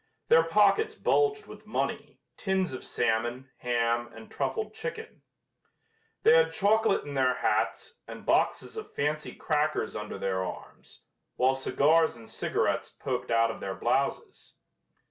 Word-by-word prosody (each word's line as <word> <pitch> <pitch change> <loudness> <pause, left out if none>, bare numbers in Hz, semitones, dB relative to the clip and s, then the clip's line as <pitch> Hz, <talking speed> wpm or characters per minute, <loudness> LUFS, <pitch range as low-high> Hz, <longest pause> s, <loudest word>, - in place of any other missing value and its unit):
Their 165 - +7
pockets 205 - +3
bulged 425 0 +1
with - - -13
money, - - -3
tins 190 -5 -1
of 130 - -6
salmon, 120 +4 -1
ham 120 -1 0
and 115 0 -13
truffled 210 +11 -2
chicken. 455 - -7 1.0
They 455 +2 +7
had 485 0 +4
chocolate 220 0 +2
in 145 - -7
their 130 -2 +2
hats 470 - -1
and - - -9
boxes - - +1
of 435 - -8
fancy 150 +1 -2
crackers 150 0 -1
under 105 0 -5
their 95 -1 -1
arms, 95 - -10 0.3
while 130 +1 +3
cigars 150 +3 +2
and 115 -1 -13
cigarettes - - -1
poked - - -4
out 115 0 +3
of - - -9
their 95 -1 -4
blouses. - - -2
145 Hz, 140 wpm, -28 LUFS, -, 1.0 s, Their